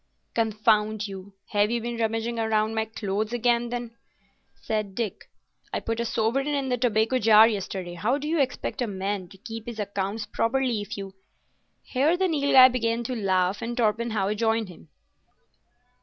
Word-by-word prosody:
"Confound 215 -1 +1
you, 195 0 -9
have 205 0 +2
you 235 +1 0
been 235 +1 -4
rummaging 225 +1 -1
round 225 -1 -1
among 215 +1 +2
my 220 0 0
clothes, 215 +1 -3
then?" 240 0 0 0.6
said 215 -3 -3
Dick. 225 -5 -4 0.4
"I - - -1
put 225 0 -3
a 235 - 0
sovereign 235 +5 0
in 280 -2 -1
the 250 - +1
tobacco 230 +1 +2
jar 220 0 +7
yesterday. 190 -4 -4
How 215 +10 0
do 295 +1 -5
you 325 +1 +1
expect 265 0 -1
a 245 - 0
man 195 -1 -3
to 195 - -16
keep 225 +1 -8
his 235 -2 -6
accounts 200 +1 -3
properly 235 +1 0
if 205 +1 -6
you——" 195 -1 -7 0.7
Here 295 +7 +1
the 380 0 +2
Nilghai 280 -5 +6
began 235 -1 -1
to 250 +2 -3
laugh, 190 -2 +1
and 235 +1 -4
Torpenhow 220 -3 +1
joined 225 -1 0
him. 165 -2 -14
225 Hz, 170 wpm, -26 LUFS, 205-240 Hz, 0.7 s, jar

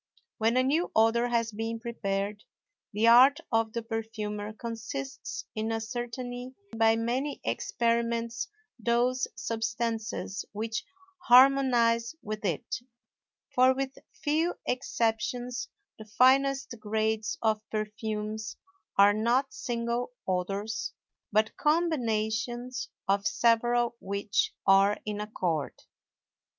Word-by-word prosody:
When 225 +3 +2
a 255 - +4
new 305 +7 +1
odor 225 +2 +4
has 230 -1 0
been 225 +2 -3
prepared, 205 -3 -3 0.5
the 215 +3 +2
art 255 +4 +8
of 225 -1 +2
the 235 - -3
perfumer 215 -2 -4
consists 220 - -6
in 220 +1 -2
ascertaining 245 +2 -4 0.2
by 225 0 +4
many 250 +6 -1
experiments 235 +4 0 0.3
those 240 +3 +1
substances 225 -2 -2
which 220 +2 -3 0.4
harmonize 245 -2 +5
with 215 0 -5
it; 170 -6 -1 0.8
for 255 +1 +5
with 270 0 -3 0.2
few 320 +4 0
exceptions 245 0 -1 0.3
the 215 - -9
finest 265 +4 +3
grades 220 +1 -1
of 215 -1 +2
perfumes 215 0 -4 0.4
are 200 +1 +7
not 240 +5 +1
single 240 -4 -2
odors 195 +4 -2 0.4
but 215 +1 +2
combinations 250 -5 0 0.2
of 200 +1 +2
several 240 +1 +2
which 200 +1 -1
are 195 +1 +5
in 210 -1 -3
accord. 170 - -2
230 Hz, 100 wpm, -29 LUFS, 215-245 Hz, 0.8 s, art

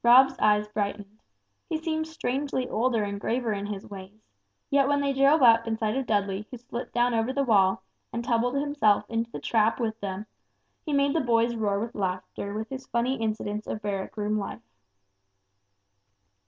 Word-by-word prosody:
'" - - -48
Rob's 260 +3 +7
eyes 210 0 +3
brightened. 205 0 -4 0.5
He 320 - 0
seemed 315 0 -2
strangely 270 -4 -2
older 230 -1 +1
and 200 0 -4
graver 235 -1 0
in 200 0 -4
his 205 -2 -5
ways, 200 +2 -11 0.5
yet 280 -1 +4
when 285 0 +2
they 280 -1 +1
drove 275 +2 +4
up 230 -1 +6
in 225 -1 -1
sight 215 -1 -1
of 265 -2 -2
Dudley 200 -1 0
who 250 - -7
slipped 240 0 -7
down 240 0 +2
over 225 +2 +1
the 275 +1 0
wall, 195 -6 +3 0.3
and 235 - -3
tumbled 245 +1 +1
himself 280 -8 +2
into 230 0 -1
the - - -6
trap 225 +1 +2
with 225 -2 -2
them, 200 0 -4 0.6
he - - -1
made 280 0 +2
the 325 - +2
boys 235 -2 +2
roar 205 -3 0
with 230 +2 -4
laughter 190 +1 -3
with 220 +1 -4
his 265 0 -6
funny 245 +3 0
incidents 215 -1 -3
of 215 - -4
barrack 200 0 -3
room 210 0 0
life. 195 - -6
225 Hz, 185 wpm, -27 LUFS, 210-260 Hz, 0.6 s, Rob's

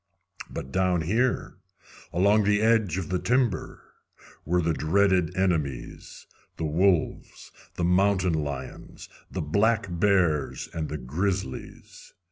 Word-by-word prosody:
But 65 - -7
down 90 +1 +1
here, 115 +10 0 0.5
along 100 +4 +3
the 105 0 +2
edge 110 -6 +2
of 95 -4 -4
the 90 0 0
timber, 125 -3 0 0.6
were 90 +3 +1
the 85 0 +1
dreaded 90 +1 +1
enemies 80 -9 -2 0.3
the 80 - -2
wolves, 85 +2 0 0.2
the 85 - -2
mountain 90 0 +2
lions, 75 -4 -6 0.2
the - - -4
black 105 +8 +2
bears, 85 -5 +1
and 80 -2 -3
the 75 - -4
grizzlies. 80 +3 -4
90 Hz, 115 wpm, -26 LUFS, 80-100 Hz, 0.6 s, along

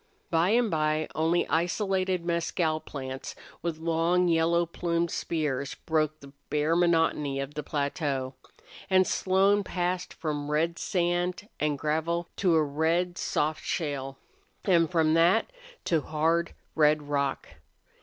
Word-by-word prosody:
By 165 +2 +3
and 230 0 +3
by 155 0 +1
only 165 +2 +1
isolated 185 +1 0
mescal 170 -2 0
plants 130 -3 -7 0.3
with 170 -2 -2
long, 165 +2 +1
yellow 170 +1 +3
plumed 170 0 -1
spears 140 -4 -2
broke 155 -1 -1
the 140 0 -13 0.2
bare 150 +2 +1
monotony 165 -5 +2
of 135 +1 -4
the 150 - -3
plateau. 140 -2 -2 0.6
And 185 -1 +5
Slone 195 +3 +2
passed 180 -1 -2
from 150 -2 -3
red 165 +3 0
sand 175 +2 -1
and 150 -1 0
gravel 160 +4 -1
to 180 -4 +3
a 160 - +4
red, 165 +5 0
soft 155 +1 -1
shale, 135 -4 -3 0.5
and 170 -4 +4
from 160 -3 +2
that 175 - +3 0.3
to 165 -3 +2
hard, 165 +3 0 0.2
red 150 -1 +3
rock. 140 -1 -1
165 Hz, 130 wpm, -28 LUFS, 150-175 Hz, 0.6 s, And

